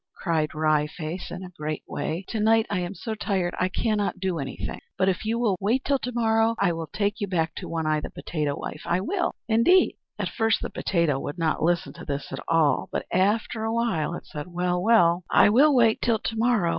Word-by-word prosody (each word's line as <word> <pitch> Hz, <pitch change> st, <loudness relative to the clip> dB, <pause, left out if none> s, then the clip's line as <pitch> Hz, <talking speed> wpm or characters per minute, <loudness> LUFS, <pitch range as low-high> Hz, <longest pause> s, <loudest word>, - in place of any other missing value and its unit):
cried 160 Hz, -3 st, -1 dB
Wry 155 Hz, -1 st, +2 dB
Face, 160 Hz, +3 st, -6 dB
in 185 Hz, +1 st, -7 dB
a 180 Hz, -, -9 dB
great 155 Hz, -3 st, -5 dB
way. 170 Hz, +5 st, -3 dB
"To 225 Hz, -, -2 dB
night 220 Hz, +1 st, +4 dB
I 200 Hz, -, 0 dB
am 180 Hz, +2 st, -4 dB
so 225 Hz, -, -4 dB
tired 190 Hz, -4 st, -1 dB
I 185 Hz, -, +1 dB
cannot 205 Hz, -1 st, -1 dB
do 185 Hz, -3 st, -1 dB
anything, 135 Hz, -2 st, -5 dB, 0.2 s
but 190 Hz, -, +2 dB
if 190 Hz, +3 st, -2 dB
you 225 Hz, +2 st, 0 dB
will 220 Hz, -6 st, +1 dB
but -, -, -13 dB
wait 240 Hz, +6 st, +1 dB
till 280 Hz, -1 st, +2 dB
to 250 Hz, -, -4 dB
morrow 225 Hz, -1 st, +2 dB
I 175 Hz, -, +2 dB
will 165 Hz, -1 st, -5 dB
take 205 Hz, +4 st, -2 dB
you 205 Hz, -, 0 dB
back 165 Hz, -3 st, 0 dB
to -, -, -6 dB
One 165 Hz, -1 st, -2 dB
Eye, 155 Hz, 0 st, +2 dB
the -, -, -6 dB
potato 150 Hz, -3 st, -3 dB
wife 155 Hz, -, -6 dB
I 175 Hz, -, +1 dB
will, 355 Hz, -, -1 dB
indeed!" 230 Hz, +12 st, +4 dB, 0.2 s
At -, -, -2 dB
first 225 Hz, -1 st, +1 dB
the -, -, -4 dB
potato 170 Hz, -7 st, 0 dB
would 145 Hz, +4 st, -5 dB
not 160 Hz, -2 st, 0 dB
listen 170 Hz, +2 st, +1 dB
to -, -, -11 dB
this 140 Hz, -1 st, -4 dB
at -, -, -4 dB
all; 155 Hz, -5 st, +2 dB
but -, -, -2 dB
after 210 Hz, +4 st, +1 dB
a 225 Hz, -, -1 dB
while 225 Hz, -9 st, 0 dB
it -, -, -9 dB
said, 150 Hz, +1 st, -7 dB
"Well, 180 Hz, 0 st, -1 dB
well, 180 Hz, -5 st, +4 dB
I -, -, +6 dB
will 275 Hz, +7 st, +5 dB
wait 230 Hz, -3 st, +4 dB
till 230 Hz, -2 st, +2 dB
to 225 Hz, -, -4 dB
morrow. 225 Hz, -6 st, +2 dB
185 Hz, 230 wpm, -25 LUFS, 165-225 Hz, 0.2 s, I